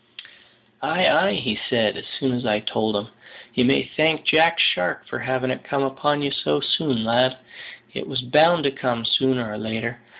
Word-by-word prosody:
"Ay, - - +1
ay!" - - +1
said - - +2
he, - - -8
as - - -10
soon 135 - 0
as 125 0 -3
I 105 -3 +1
had 105 0 -4
told 110 -1 -1
him, 100 +2 -3 0.4
"you 125 - +2
may 130 +3 +3
thank 155 0 +2
`Jack 165 +2 +4
Shark' 90 0 +1
for - - -6
having 130 0 -2
it - - -5
come 140 -1 -2
upon 145 +2 -1
ye 140 - -1
so 75 - 0
soon, 135 -9 0
lad; 125 +3 +2 0.6
it - - -6
was 130 -2 -3
bound 155 +6 +4
to 140 - +1
come 125 -4 -3
sooner 130 0 +1
or 105 0 -6
later. 115 +2 -5
130 Hz, 195 wpm, -22 LUFS, 115-140 Hz, 0.6 s, `Jack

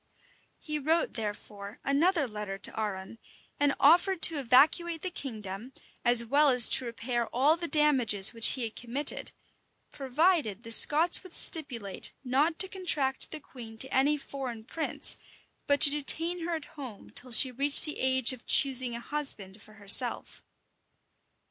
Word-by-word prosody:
He 305 -1 -7
wrote, 320 +4 -2
therefore, 210 -1 -9
another 295 +2 -1
letter 210 -3 -8
to 195 - -4
Arran; 205 0 -7 0.4
and 285 -1 -1
offered 345 +4 +1
to 320 -2 +6
evacuate 315 +6 0
the 370 - -5
kingdom, 220 - -9 0.3
as 240 -1 +3
well 285 +5 +1
as 250 -3 +6
to 260 - +4
repair 235 0 -5
all 280 +6 0
the 340 0 -7
damages 255 -11 +1
which 230 -1 +4
he 255 - -4
had 225 -1 -7
committed, 260 +5 -1 0.6
provided 275 - -2
the 230 - -8
Scots 315 +8 +6
would 370 -2 -16
stipulate 245 - 0
not 285 +6 -2
to 380 - 0
contract 300 -9 -3
the 310 - -9
queen 235 -6 -14
to 265 +4 -1
any 285 +3 0
foreign 260 -5 -9
prince, 315 +7 -2 0.5
but 285 0 0
to 285 - +6
detain 325 +4 +1
her 340 - -4
at 315 -2 -9
home 260 -9 -12
till 250 0 -6
she 255 +3 +5
reached 280 +3 +1
the 300 - -6
age 260 -1 +1
of 250 - -16
choosing 255 -3 +3
a - - -7
husband 230 -8 0
for 215 - -16
herself. 215 +4 +1
265 Hz, 155 wpm, -26 LUFS, 230-300 Hz, 0.6 s, to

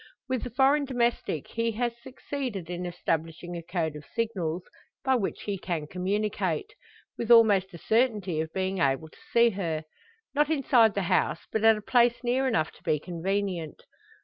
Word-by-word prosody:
With 255 -2 -1
the 250 - -4
foreign 275 +4 +3
domestic 240 - -1
he 230 0 -1
has 240 +1 -1
succeeded 255 - -5
in 175 0 -3
establishing 165 0 -3
a 170 - -4
code 165 -2 -2
of 150 - -8
signals, 185 -8 -1 0.4
by 265 - +3
which 230 -7 -1
he 200 -2 -3
can 170 -5 -3
communicate 185 -1 -2 0.5
with 235 - -3
almost 210 -5 +6
a - - -7
certainty 210 -6 +1
of 160 0 -5
being 190 0 -2
able 135 +2 +1
to - - -20
see 235 0 +5
her. 165 -6 -2 0.5
Not 295 +1 +2
inside 250 -7 +4
the 200 - 0
house, 175 - +1
but 220 - -1
at 225 -1 +6
a 210 - -8
place 240 +1 +3
near 255 +2 +1
enough 160 -11 +1
to - - -20
be 155 -4 +1
convenient. 180 -1 -3
200 Hz, 175 wpm, -28 LUFS, 170-235 Hz, 0.5 s, almost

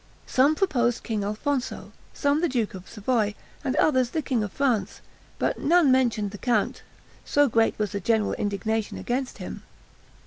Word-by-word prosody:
Some 280 +4 +3
proposed 245 -10 +1
King 215 -4 -2
Alfonso, 245 +6 -2 0.2
some 285 +1 +1
the 345 - +2
duke 240 -5 -1
of 185 -1 -10
Savoy, 215 -1 0 0.3
and 265 -2 -1
others 260 -6 +3
the 315 +2 -2
king 250 -5 0
of 205 - -4
France, 255 -7 0 0.4
but - - -1
none 335 -3 +4
mentioned 235 -6 +2
the 205 - -9
count, 235 -4 0 0.4
so 290 0 +3
great 225 -2 +2
was 210 -2 -1
the 200 - -2
general 220 +2 +1
indignation 210 +2 -2
against 255 +2 -3
him. - - -7
240 Hz, 165 wpm, -26 LUFS, 210-275 Hz, 0.4 s, none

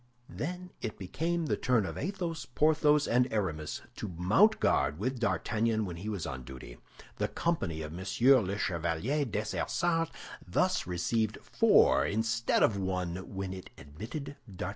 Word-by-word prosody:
Then 180 +3 -5
it 110 - -4
became 165 - -2
the - - +1
turn 120 -5 +2
of - - -5
Athos, 175 -1 -3
Porthos, 150 +2 +3
and 125 +2 +2
Aramis 80 -8 -2
to - - -4
mount 95 - +3
guard 70 +2 +2
with 125 +6 -2
D'Artagnan 110 -1 0
when 85 -3 -6
he 100 +5 -5
was 100 -6 -3
on 65 -1 -5
duty. 60 -1 -10 0.4
The - - 0
company 95 - -1
of 75 - -6
M. 85 - -7 0.4
le 100 +2 -3
Chevalier 90 - 0
Dessessart 165 - -1 0.4
thus - - +1
received 105 +5 0
four 70 - +4
instead 110 +7 +1
of 105 - +3
one 90 -2 -2 0.2
when 95 -1 -3
it 95 -1 -9
admitted 115 - -7
D'Artagnan. 95 -4 -5
110 Hz, 150 wpm, -31 LUFS, 90-145 Hz, 0.4 s, four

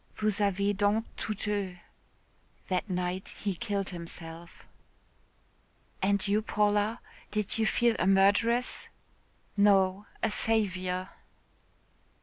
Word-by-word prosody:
Vous 215 -1 0
avez 200 0 +2
donc 205 +3 +1
tout 210 0 -4
eu.' 200 -3 -2 0.9
That 185 +2 -1
night 180 +1 -2
he 200 -2 0
killed 200 0 -2
himself." 170 -1 -8 1.4
"And 200 +1 +1
you, 205 +2 +2
Paula, 210 +1 +1 0.3
did 210 +1 -1
you 220 - +3
feel 235 +1 +3
a 185 - +2
murderess?" 205 +6 +3 0.7
"No, 200 -1 +3 0.2
a 220 - +2
saviour." 185 -5 +1
200 Hz, 105 wpm, -29 LUFS, 185-210 Hz, 1.4 s, you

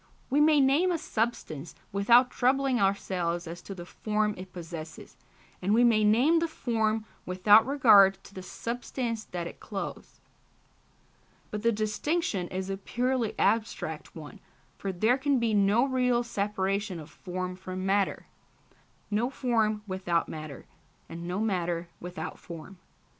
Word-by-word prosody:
We 290 +2 +4
may 305 -1 +5
name 285 +7 +4
a 345 - +1
substance 215 - -3 0.2
without 235 +6 +5
troubling 265 0 +2
ourselves 180 -3 0
as 170 +1 -7
to 195 - -8
the 175 -1 -8
form 210 +2 -1
it 185 0 -10
possesses, 165 -2 -8 0.5
and 200 +4 +2
we 240 - +5
may 225 -3 +4
name 250 +11 +4
the 335 - 0
form 225 -7 -1 0.2
without 205 +5 +5
regard 215 -9 +6
to - - -15
the 185 - -7
substance 230 +3 -4
that 175 -1 -5
it - - -8
clothes. 200 -2 -7 1.3
But 210 - -3
this 230 +1 +2
distinction 215 - -1
is 185 +1 -4
a 195 - -3
purely 245 +3 -1
abstract 225 0 -1
one, - - -10 0.4
for 195 - -4
there 220 +8 +2
can 280 0 +2
be 230 -2 +1
no 205 +4 +4
real 250 -2 +1
separation 200 -3 -2
of 155 0 -11
form 185 +1 -5
from 185 0 -6
matter, 195 0 +1 0.9
no 220 +4 +1
form 225 -6 0
without 185 -4 -1
matter, 155 -3 -8 0.4
and 170 +1 -7
no 180 +2 -2
matter 175 -5 -1
without 180 +1 -6
form. 170 +2 -10
210 Hz, 145 wpm, -28 LUFS, 185-240 Hz, 1.3 s, regard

